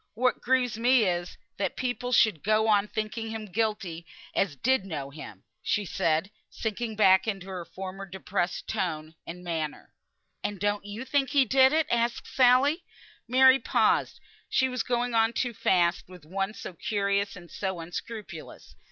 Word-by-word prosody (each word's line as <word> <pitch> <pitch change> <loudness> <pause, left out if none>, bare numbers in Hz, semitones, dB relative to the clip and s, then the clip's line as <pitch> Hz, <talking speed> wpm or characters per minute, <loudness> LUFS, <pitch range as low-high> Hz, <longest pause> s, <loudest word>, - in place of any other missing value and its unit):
What 255 +3 +1
grieves 250 -3 +1
me 245 0 +5
is, 175 -2 -1 0.2
that - - -2
people 250 -1 -3
should 215 -9 +4
go 215 +1 +3
on 210 -1 +3
thinking 220 +1 -4
him 220 -1 -5
guilty 200 -5 -2 0.3
as 180 -7 0
did 260 - +2
know 145 -7 -5
him," 110 -10 -10 0.2
she 210 - 0
said, 165 +2 0 0.2
sinking 220 0 -4
back 190 -1 +5
into 195 -4 -3
her 185 -2 -5
former 190 +2 -7
depressed 180 -1 -3
tone 160 -7 -3
and 180 +1 -8
manner. 160 -3 -4 0.5
"And 205 -2 -3
don't 205 +1 -1
you 210 +5 -6
think 270 0 +1
he 275 0 +4
did 265 +2 +5
it?" 315 0 +2
asked 235 0 0
Sally. 265 +6 +4 0.4
Mary 260 +2 +6
paused; - - +1 0.3
she 260 - +3
was 255 -2 -2
going 245 0 -1
on 225 0 +3
too 245 0 -1
fast 175 -4 +2
with 180 -4 -13
one 195 +5 -3
so - - -7
curious 200 +2 -1
and 175 -2 -13
so 190 -3 -3
unscrupulous. 175 +1 -8
210 Hz, 160 wpm, -28 LUFS, 180-240 Hz, 0.5 s, Mary